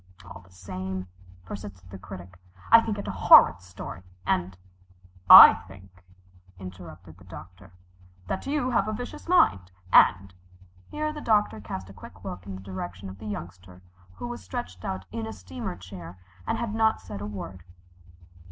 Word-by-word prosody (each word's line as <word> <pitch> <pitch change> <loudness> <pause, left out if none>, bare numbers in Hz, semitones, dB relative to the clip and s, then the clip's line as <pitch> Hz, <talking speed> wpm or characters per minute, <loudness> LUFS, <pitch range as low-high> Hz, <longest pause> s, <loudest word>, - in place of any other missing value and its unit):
"All 90 +1 -11
the 90 - -22
same," 95 0 -6 0.4
persisted 95 -1 -10
the 95 - -9
Critic, 90 -1 -11 0.3
"I 230 0 +9
think 220 -2 -3
it 200 - -6
a - - -2
horrid 90 +1 +6
story 90 0 -9 0.2
and 90 0 -1 0.4
" 90 0 -27
"I - - +12
think," 95 -1 -16 0.5
interrupted 90 -2 -11
the - - -17
Doctor, 90 0 -13 0.5
"that 190 - -5
you 275 -3 -1
have 215 -4 +1
a 215 - -2
vicious 245 +8 -8
mind, 100 - +3 0.2
and 95 -1 +5 0.3
" 90 0 -27
Here 305 0 -3
the 300 - -8
Doctor 210 - +1
cast 95 -2 -7
a 95 - -13
quick 95 0 -14
look 95 -1 -8
in 95 - -6
the 95 - -10
direction 95 0 -7
of 95 0 -12
the 110 - -9
Youngster, 90 -2 -9 0.3
who 95 - -7
was 120 -4 -7
stretched 90 0 -7
out 95 0 -5
in 110 +2 -5
a 110 - -6
steamer 90 -2 -7
chair 90 -1 -11 0.3
and - - -1
had 235 -3 -3
not 220 0 +2
said 100 - -9
a 105 - -5
word. 95 -3 -8
95 Hz, 175 wpm, -26 LUFS, 90-105 Hz, 0.5 s, I